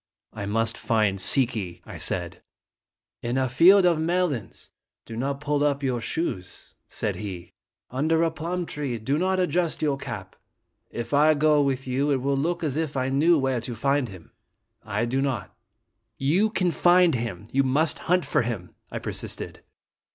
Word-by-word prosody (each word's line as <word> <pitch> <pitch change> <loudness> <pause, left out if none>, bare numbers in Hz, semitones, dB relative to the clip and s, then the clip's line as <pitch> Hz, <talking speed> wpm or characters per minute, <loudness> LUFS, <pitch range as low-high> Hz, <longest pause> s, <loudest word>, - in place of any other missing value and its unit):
"I 100 -2 -5
must 115 +2 0
find 105 -4 +1
Si 130 +7 +4
ki," 105 -8 -6
I - - -9
said. - - -2 0.4
" - - -68
In 120 +2 -1
a 130 0 +2
field 180 +10 +6
of 170 -3 +3
melons 165 - -1 0.3
do 115 - -8
not 135 +4 -2
pull 145 0 0
up 140 -1 +1
your 125 -3 0
shoes," 95 - -4
said - - -3
he; 90 -5 -7 0.4
"under 160 +6 +2
a 165 - +1
plum 170 +3 -3
tree 140 -6 -3
do 135 +7 -1
not 185 +1 +1
adjust 175 -3 0
your 145 -2 +1
cap. 115 -9 -7 0.5
If 120 +1 -5
I 155 +2 +5
go 150 0 +4
with 135 -2 0
you, 135 +3 0
it 140 - +3
will 140 +2 0
look 170 +5 -1
as 150 -2 -1
if 155 -3 -2
I 130 0 0
knew 155 +5 +4
where 135 -3 0
to 120 +1 -5
find 135 +2 +1
him. 90 -4 -13 0.5
I 105 +2 -1
do 130 +3 0
not." 125 -9 -3 0.6
"You 175 +11 +2
can 185 -5 +1
find 175 0 +5
him. 115 -6 -3
You 135 - +3
must 145 +4 +1
hunt 180 0 +3
for - - +2
him," 110 -7 -4 0.2
I - - -5
persisted. - - -5
135 Hz, 180 wpm, -25 LUFS, 120-160 Hz, 0.6 s, field